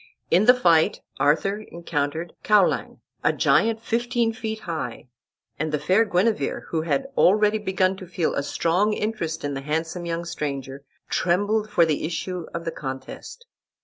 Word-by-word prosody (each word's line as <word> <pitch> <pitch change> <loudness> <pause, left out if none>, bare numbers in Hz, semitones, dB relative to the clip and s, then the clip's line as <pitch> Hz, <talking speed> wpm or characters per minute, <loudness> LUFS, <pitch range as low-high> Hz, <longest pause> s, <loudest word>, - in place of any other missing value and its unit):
In 185 +5 +5
the 250 +2 +8
fight 170 -9 +3 0.2
Arthur 195 +8 +2
encountered 165 -4 -3
Caulang, 210 -3 +2 0.2
a - - +4
giant 225 0 +2
fifteen 230 0 0
feet 220 0 -5
high, 160 -7 -5 0.5
and 155 +1 -1
the 150 - +1
fair 185 +9 +3
Guenever, 210 +3 0
who 160 - 0
had 270 +12 0
already 210 +3 +4
began 190 -2 +1
to 185 - -9
feel 170 -2 -1
a - - 0
strong 180 +8 +1
interest 190 -8 -3
in 145 0 -2
the 135 - -4
handsome 160 +4 -3
young 170 0 -2
stranger, 140 -4 -5 0.2
trembled 205 +5 +1
for 175 -5 +4
the 155 -3 -1
issue 175 +2 -3
of 170 0 -5
the 165 - -1
contest. 135 - -7
175 Hz, 155 wpm, -24 LUFS, 160-210 Hz, 0.5 s, the